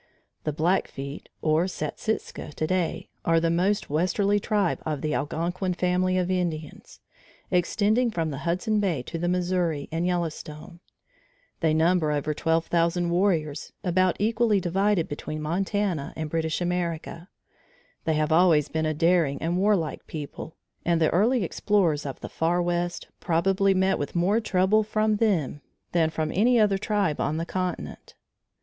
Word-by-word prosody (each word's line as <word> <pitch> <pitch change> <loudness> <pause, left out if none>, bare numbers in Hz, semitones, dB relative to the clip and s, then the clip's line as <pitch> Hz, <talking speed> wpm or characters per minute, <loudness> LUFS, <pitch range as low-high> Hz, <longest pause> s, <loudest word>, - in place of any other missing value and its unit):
The 155 - +1
Blackfeet 150 -3 -2
or 155 +2 +3
Satsika 180 0 -4
today, 175 +2 -1
are 165 0 +3
the 165 0 +1
most 190 +5 +1
westerly 195 +6 +2
tribe 205 -3 0
of 150 -3 -3
the 155 -1 -1
Algonquin 175 +6 -2
family 185 +1 +1
of 180 0 0
Indians, 165 -5 -4 0.5
extending 215 +7 +2
from 165 -7 -2
the 135 - -5
Hudson 180 +7 0
Bay 175 -11 0
to 165 - -5
the 175 - -1
Missouri 180 -4 0
and 165 +2 -1
Yellowstone. 170 -2 -4 0.8
They 160 -3 +2
number 160 -1 +3
over 150 +1 -1
12,000 170 +2 +1
warriors 165 -5 0
about 185 0 +2
equally 220 0 +2
divided 190 0 +1
between 155 +1 -5
Montana 180 0 -1
and 155 -1 -4
British 160 0 -1
America. 175 0 -3 0.8
They 160 -1 +1
have 155 0 0
always 160 -3 +4
been 160 0 -1
a 155 - -1
daring 165 -3 +2
and 170 +3 -1
warlike 195 -6 0
people, 155 +1 -7 0.3
and 170 -1 +2
the 160 - +3
early 220 +6 +3
explorers 170 -6 +1
of 135 - -7
the - - -5
Far 170 +2 0
West 175 0 -1
probably 195 +3 +2
met 190 +1 +2
with 145 - -4
more 190 +6 +3
trouble 205 0 +2
from 215 0 +1
them 170 - 0 0.3
than 165 -2 +2
from 155 -1 -2
any 235 +5 +4
other 200 -3 +3
tribe 200 -7 0
on 155 - 0
the 165 - -2
continent. 185 0 -4
175 Hz, 150 wpm, -26 LUFS, 160-190 Hz, 0.8 s, always